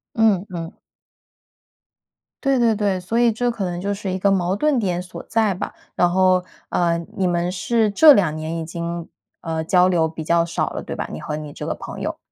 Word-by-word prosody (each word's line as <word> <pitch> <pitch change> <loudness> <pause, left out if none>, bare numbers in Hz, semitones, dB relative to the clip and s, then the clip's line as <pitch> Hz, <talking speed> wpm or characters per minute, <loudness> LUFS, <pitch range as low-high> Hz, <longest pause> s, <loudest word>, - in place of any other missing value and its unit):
嗯 215 -5 +3
嗯。 170 -1 -6 1.7
对 275 -2 +2
对 230 -2 +3
对， 200 -3 0
所 180 +6 -2
以 240 -1 +4
这 245 +3 0
可 230 -4 -3
能 175 -1 -3
就 200 +2 -1
是 200 -1 -4
一 185 - -2
个 200 +1 +3
矛 185 -1 +1
盾 300 +5 +2
点 180 -6 0
所 180 0 -9
在 220 -3 +2
吧。 180 - -5 0.2
然 175 - +3
后， 185 0 +3 0.3
呃， 170 -1 +1 0.2
你 190 - +1
们 175 0 0
是 220 +4 +1
这 295 +9 +8
2 180 - +2
年 155 +1 -4
已 165 - -4
经 170 0 -5 0.3
呃， 160 -1 -3
交 180 +2 +4
流 170 -3 +2
比 160 0 -7
较 170 +1 +2
少 170 - -1
了， - - -5
对 - - -6
吧， - - -4
你 75 - -6
和 150 - -4
你 150 -1 -7
这 - - -7
个 - - -1
朋 - - -8
友？ - - -3
185 Hz, 225 characters per minute, -21 LUFS, 170-210 Hz, 1.7 s, 这